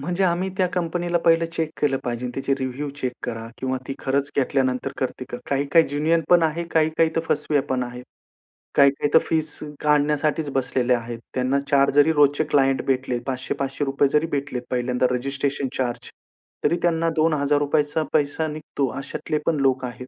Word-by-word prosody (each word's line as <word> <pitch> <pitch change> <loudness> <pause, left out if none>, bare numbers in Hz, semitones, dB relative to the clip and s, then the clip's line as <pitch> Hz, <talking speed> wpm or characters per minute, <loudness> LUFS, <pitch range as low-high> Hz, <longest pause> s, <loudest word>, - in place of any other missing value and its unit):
म्हणजे 180 +6 0
आम्ही 180 +1 +1
त्या 185 - +4
कंपनीला 175 0 0
पहिलं 165 0 +4
चेक 160 -2 -2
केलं 135 -2 +2
पाहिजे 120 0 -3
त्याचे 135 0 0
रिव्ह्यू 130 +2 -3
चेक 125 -1 -1
करा 115 -2 -4
किंवा 130 0 -2
ती 135 - -3
खरंच 140 +1 -1
घेतल्यानंतर 130 -2 0
करते 130 -1 -3
करा. 120 - -5
काही-काही 140 +4 +3
ज्येन्युअन 155 +4 +1
पण 175 -1 +6
आहे, 160 +2 0
काही-काही 160 0 +3
तर - - +3
फसव्या 145 -1 +1
पण 130 -1 +1
आहेत. 125 0 -7 0.7
काही-काही 140 +1 +4
तर - - +8
फीस 155 -2 -1 0.3
काढण्यासाठीच 150 +1 +2
बसलेले 130 -1 +1
आहेत. 120 -1 -3 0.2
त्यांना 130 +2 +1
4 140 -1 +5
जरी 145 +3 +5
रोजचे 145 0 +4
क्लायंट 135 -1 +3
भेटलेत 130 -2 0
₹500-500 135 +2 -1
जरी 150 +3 +2
भेटलेत 140 -3 -2
पहिल्यांदा 125 0 0
रजिस्ट्रेशन 135 +2 -1
चार्ज 120 -2 -3 0.5
तरी - - +3
त्यांना 165 -1 +2
₹2,000चा 145 -1 +1
पैसा 150 +1 +1
निघतो 150 -2 -3
अशातले 140 +2 -3
पण 165 - +2
लोक 130 -1 +2
आहेत. 125 +1 -8
140 Hz, 160 wpm, -23 LUFS, 130-155 Hz, 0.7 s, तर